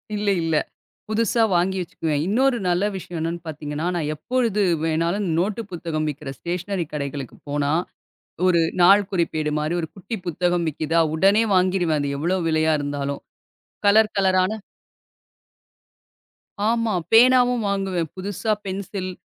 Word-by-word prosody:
இல்ல 205 0 0
இல்ல. 160 -1 0 0.5
புதுசா 225 +1 +1
வாங்கி 180 +2 +1
வச்சிக்குவேன். 155 -3 -2
இன்னொரு 250 +6 +2
நல்ல 175 +3 +1
விஷயம் 175 -2 -6
என்னன்னு 165 +1 -3
பாத்தீங்கன்னா? 150 +1 -4
நான் 150 -3 -1
எப்பொழுது 230 - 0 0.2
வேணாலும் 170 +5 0
நோட்டு 210 +6 -1
புத்தகம் 165 -3 -3
விக்கிற 145 -1 -7
ஸ்டேஷ்னரி 180 +1 -3
கடைகளுக்குப் 140 -3 -5
போனா, 145 0 0 0.7
ஒரு 175 -2 +4 0.2
நாள்குறிப்பேடு 175 -5 +3
மாரி 155 +3 -1
ஒரு 160 - -4
குட்டி 200 +4 -6
புத்தகம் 175 0 0
விக்குதா? 160 +2 0
உடனே 195 +6 +4
வாங்கிடுவேன் 180 -4 +2
அது 145 - -2
எவ்ளோ 175 +5 0
விலையா 160 0 +2
இருந்தாலும் 140 0 -3 0.6
கலர் 215 +1 +5
கலரான 185 0 +3 2.2
ஆமா. 230 -2 +1 0.2
பேனாவும் 245 0 +5
வாங்குவேன். 190 -5 -1
புதுசா 200 +3 -3
பென்சில், 190 0 -4
180 Hz, 120 wpm, -23 LUFS, 155-200 Hz, 2.2 s, கலர்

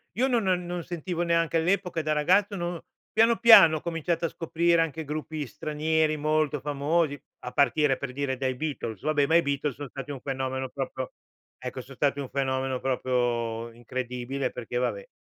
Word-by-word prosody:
io 255 +4 +2
non 240 -4 +2
non 180 -2 +1
non 175 -1 -4
sentivo, 175 0 -3
neanche 165 -1 +2
all'epoca 175 0 0
da 155 0 0
ragazzo, 185 +7 +3
non 175 -1 -3
ho - - -10 0.3
piano 225 +1 +4
piano, 165 -9 +8
ho - - -8
cominciato 165 0 -1
a - - 0
scoprire 170 +1 +1
anche 160 0 -2
gruppi 155 0 -4
stranieri 155 +3 0
molto 155 -1 +1
famosi, 145 +1 0 0.2
a 125 - -7
partire, 140 -1 +3
per 140 -2 -5
dire, 135 0 -2
dai 130 0 -1
Beatles. 125 -7 -4
Vabbè, 145 -2 +2
ma 165 - +3
i 170 - +7
Beatles 140 -1 -1
son 145 0 -7
stati 140 +2 -7
un 135 - -6
fenomeno 130 -1 -3
proprio 130 -1 -4 0.5
ecco, 125 +1 -4
son 135 +2 -13
stati 140 +1 +1
un 135 - -4
fenomeno 130 -1 -1
proprio 120 -3 -1
incredibile, 125 +3 -4
perché, 120 0 -5
vabbè. - - -2
150 Hz, 180 wpm, -27 LUFS, 130-165 Hz, 0.5 s, piano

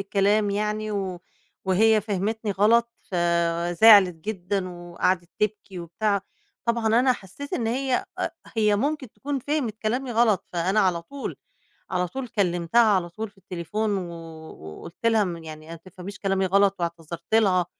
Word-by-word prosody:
الكلام 200 +1 +2
يعني 210 +1 -1
و 190 -3 -3 0.4
وهي 215 +4 +4
فهمتني 210 +2 -2
غلط 230 +5 +3 0.2
فزعلِت 175 +3 +5
جدًا 185 +1 -3
وقعدِت 175 0 -2
تبكي 205 -3 -2
وبتاع، 200 +4 -1 0.4
طبعًا 235 -1 0
أنا 245 +4 +4
حسّيت 235 +7 -9
إن 230 - -1
هي 255 +2 0
أ - - 0 0.3
هي 210 -2 +3
ممكن 280 0 -2
تكون 285 0 -3
فهمِت 255 -5 -2
كلامي 250 +4 -2
غلط، 225 -3 +3
فأنا 185 +5 +1
على 175 -3 +1
طول 280 +9 -6 0.5
على 180 -1 0
طول 265 +6 -5
كلِّمتها 180 +1 +2
على 190 -6 +3
طول 215 +5 -6
في 200 - -33
التليفون 195 +3 -2
و 175 -2 -5 0.7
وقُلت 170 +7 -10
لها 225 -2 +4
م 170 -3 -5
يعني 155 0 -10
"ما 165 - -7
تفهميش 185 +3 -10
كلامي 195 -1 +1
غلط" 200 +1 +3
واعتذرت 170 +2 -3
لها 185 -5 +4
200 Hz, 150 wpm, -25 LUFS, 175-220 Hz, 0.7 s, فزعلِت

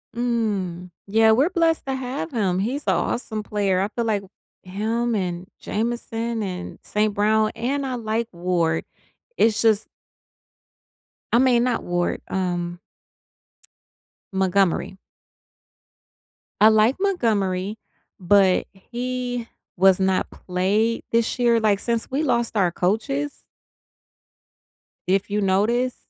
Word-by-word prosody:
Mm, 205 -7 -1 0.2
yeah. 220 +2 +4
We’re 265 +9 +4
blessed 330 -2 +2
to 270 -1 -2
have 260 +4 -4
him. 195 -7 0
He’s 255 +9 -2
a - - +4
awesome 220 -3 -2
player. 200 -3 0
I 195 - +1
feel 235 +2 -3
like 210 -3 0 0.4
him 225 +5 -1
and 180 -2 -3
Jameson 230 0 -2
and 180 -2 -6
St. 210 0 0
Brown, 215 +1 +2
and 270 +5 -1
I 260 -1 -2
like 225 0 -2
Ward. 170 -2 0 0.5
It’s 220 - +3
just 220 -2 +3 1.5
I 235 - +6
mean, 250 -2 +4
not 245 -2 0
Ward, 175 0 -1
um 175 -2 -2 1.5
Montgomery. 190 0 +1 1.6
I 215 - +8
like 220 +4 +4
Montgomery, 215 - 0 0.4
but 190 0 +4
he 245 +3 -4 0.3
was 190 0 +5
not 190 -1 +1
played 200 +5 0
this 230 -1 +1
year. 235 -2 +3
Like, 210 -3 +2
since 235 0 -2
we 275 +4 -1
lost 235 -5 0
our 180 -4 +3
coaches 275 +12 -1 1.7
if 195 +2 +1
you 205 +1 0
notice, 215 +6 +1
215 Hz, 115 wpm, -23 LUFS, 190-240 Hz, 1.7 s, I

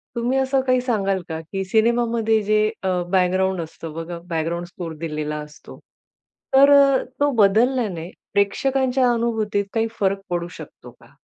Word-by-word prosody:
तुम्ही 240 +3 0
असं 265 0 +1
काही 255 0 +3
सांगाल 195 -6 0
का? 160 0 -4
की 195 +4 -5
सिनेमामध्ये 225 +1 +2
जे 215 +1 +2 0.2
अ, - - -1 0.2
बॅकग्राऊंड 185 0 +1
असतं 160 0 -8
बघा 165 +2 -6
बॅकग्राऊंड 170 +1 -2
स्कोर 175 -2 -7
दिलेला 150 -2 -3
असतो. 150 0 -12 0.8
तर 275 +1 +7
अ, 275 -2 +5 0.2
तो 290 0 +3
बदलल्याने 210 -4 +2 0.2
प्रेक्षकांच्या 255 +5 +1
अनुभूतीत 225 -3 -1
काही 225 0 +1
फरक 195 0 +1
पडू 175 -1 -2
शकतो - - -12
का? - - -22
205 Hz, 145 wpm, -22 LUFS, 175-240 Hz, 0.8 s, तर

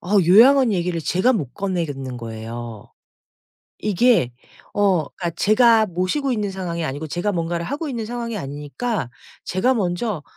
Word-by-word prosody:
어 180 - -9
요양원 240 +6 +6
얘기를 175 -2 -1
제가 185 +10 +2
못 150 - -3
꺼내겠는 150 -10 -3
거예요. 115 0 -7 0.9
이게 210 - +3 0.4
어 195 -6 +2
그러니까 170 -2 -5
제가 220 +4 +4
모시고 185 - -1
있는 210 -4 -1
상황이 170 -3 -4
아니고 145 +3 -4
제가 175 +7 -2
뭔가를 170 0 -2
하고 290 +2 -4
있는 230 -4 -4
상황이 235 -1 -4
아니니까 145 - -4 0.3
제가 215 +9 +1
먼저 185 - -2
185 Hz, 330 characters per minute, -21 LUFS, 155-225 Hz, 0.9 s, 요양원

